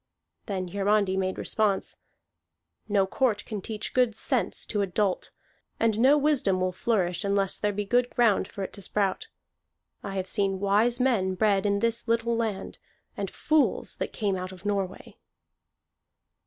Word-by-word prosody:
Then 185 -4 -3
Hiarandi 200 0 +1
made 190 0 -1
response: 210 -3 0 0.9
"No 200 -2 +3
court 210 +1 0
can 210 -3 -5
teach 215 +1 -5
good 250 -4 +2
sense - - 0
to 210 - -1
a 200 - 0
dolt, 190 +1 -1 0.5
and 225 -1 +2
no 270 +5 +6
wisdom 275 -11 +2
will 185 0 0
flourish 185 -2 0
unless 200 -1 0
there 210 - +1
be 205 +1 -3
good 245 +4 +2
ground 220 -5 +2
for 200 - -6
it - - -6
to 200 - -10
sprout. 195 0 -1 0.7
I 195 -1 -6
have 190 -1 -2
seen 195 -2 0
wise 210 +5 +2
men 210 -8 +1
bred 200 0 +2
in 200 0 +1
this 230 +1 0
little 230 0 +1
land, 220 -4 -3 0.4
and - - -3
fools 310 -2 +1
that - - -3
came 205 -3 -1
out 185 0 -5
of 185 +1 -13
Norway." 195 -2 -3
205 Hz, 160 wpm, -27 LUFS, 190-230 Hz, 0.9 s, no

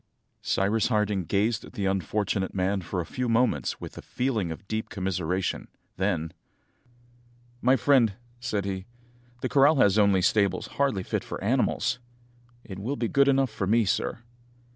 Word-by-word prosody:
Cyrus 105 +3 +1
Harding 105 -5 0
gazed 105 +6 0
at - - -12
the 100 -5 -2
unfortunate 95 +1 -1
man 95 +1 0
for 90 +1 -3
a - - -5
few 125 +5 -3
moments 120 +2 +1
with - - -8
a - - -7
feeling 115 -9 -2
of 95 +5 -9
deep 110 +1 -3
commiseration; 95 -2 -2 0.3
then, 85 -4 -1 1.3
"My 130 +2 +5
friend," 130 -6 +4 0.3
said 110 -5 -2
he, 95 -1 -4 0.6
"the - - 0
corral 145 +3 +5
has 105 -6 +4
only 100 -3 +4
stables 100 -3 +2
hardly 135 -9 -1
fit - - -2
for - - -6
animals." - - +1 0.6
"It 95 -2 -8
will 125 +8 -2
be 120 - -1
good 140 0 +4
enough 135 -3 +3
for 105 -3 -3
me, 115 +2 +3
sir." 115 +4 -1
105 Hz, 160 wpm, -27 LUFS, 95-120 Hz, 1.3 s, My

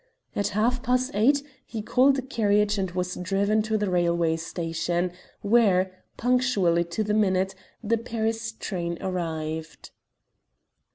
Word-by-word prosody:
At 200 - +1
half 245 +3 +2
past 255 +1 +1
eight 275 +7 +3 0.2
he 220 -3 -6
called 265 +4 +4
a 265 - -2
carriage 210 -5 +1
and 190 -1 -1
was 180 +1 -2
driven 200 +4 +1
to 220 0 0
the 210 -1 -1
railway 170 -2 +2
station, 170 +1 -2 0.3
where, 200 -4 +3 0.3
punctually 235 -9 +2
to 170 +6 -2
the 210 0 -1
minute, 190 -2 +2 0.3
the 230 +1 +1
Paris 225 -1 -2
train 170 -6 -4
arrived. 160 -3 -4
205 Hz, 130 wpm, -26 LUFS, 175-225 Hz, 0.3 s, called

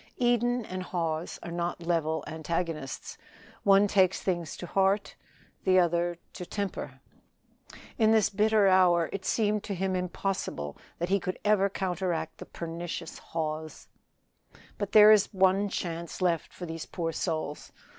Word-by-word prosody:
Eden 240 -1 +2
and 185 -1 -5
Hawes 165 -3 -3
are 170 - -6
not 175 0 -3
level 160 -2 0
antagonists 160 -3 -4 0.4
one 200 +1 +5
takes 190 -2 +3
things 175 -4 -2
to - - -6
heart, 195 +3 +1 0.5
the 185 -1 +4
other 175 -1 +2 0.2
to 180 - -6
temper. 200 +2 -5 1.0
In 220 -1 +5
this 220 -3 +4
bitter 210 0 +3
hour 180 -3 +4
it 195 -1 -5
seemed 210 -2 +1
to 200 - -3
him 190 +1 -1
impossible 180 - -3 0.2
that 175 +1 -2
he 200 +1 +3
could 185 0 -4
ever 200 -2 +4
counteract 180 -4 -2
the - - -9
pernicious 170 0 -6
Hawes. 155 -1 -5 0.9
"There 210 +1 +7
is 210 -2 +6
but 195 - -14
one 190 +2 +4
chance 170 -3 -4
left 175 -4 0
for 180 - -7
these 165 -1 -6
poor 165 -2 -3
souls. 155 -3 -3
180 Hz, 145 wpm, -29 LUFS, 170-200 Hz, 1.0 s, There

